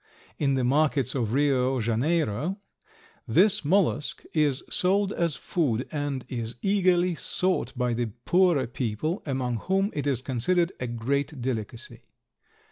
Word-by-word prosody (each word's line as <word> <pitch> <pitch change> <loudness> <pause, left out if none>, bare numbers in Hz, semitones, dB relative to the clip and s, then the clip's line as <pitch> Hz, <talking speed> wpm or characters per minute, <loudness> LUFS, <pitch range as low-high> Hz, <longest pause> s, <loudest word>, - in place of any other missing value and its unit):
In 140 -2 +2
the 130 - 0
markets 140 0 +2
of 115 -5 -1
Rio 135 -1 +2
Janeiro 140 - 0 0.7
this 210 -2 +4
mollusk 160 -2 +1
is 145 -4 +1
sold 195 +2 +1
as 170 -4 0
food 130 - -1
and 145 -4 -3
is 115 -2 -5
eagerly 185 -3 +3
sought 185 +3 -1
by 125 -1 0
the 120 0 -1 0.2
poorer 175 -6 +3
people, 125 - -3
among 130 -3 -1
whom 195 - 0
it 145 -1 -2
is 130 -3 0
considered 170 +8 +1
a 125 - -3
great 135 +5 -2
delicacy. 120 -1 -5
140 Hz, 130 wpm, -26 LUFS, 125-175 Hz, 0.7 s, this